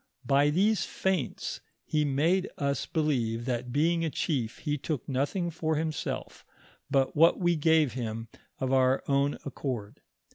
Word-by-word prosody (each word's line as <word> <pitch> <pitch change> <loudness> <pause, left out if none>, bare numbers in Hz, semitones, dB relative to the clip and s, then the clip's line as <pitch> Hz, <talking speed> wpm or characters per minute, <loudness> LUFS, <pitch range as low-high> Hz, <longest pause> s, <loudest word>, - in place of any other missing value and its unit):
By 140 +3 +4
these 200 +7 +2
feints 190 -7 -2 0.2
he 150 -1 +1
made 160 +7 +2
us 140 0 -1
believe 120 -8 0
that 125 -1 -2
being 165 +5 +2
a 165 - 0
chief, 130 -7 -2
he 150 -2 -2
took 145 -3 -4
nothing 145 +7 -1
for 160 0 -1
himself, 155 0 -3 0.5
but 135 -2 +1
what 165 +3 +5
we 175 -2 +2
gave 160 -3 +3
him 115 -2 -4 0.3
of 130 0 0
our 130 0 +3
own 140 +1 +2
accord. 125 -7 -5
145 Hz, 145 wpm, -29 LUFS, 130-160 Hz, 0.5 s, what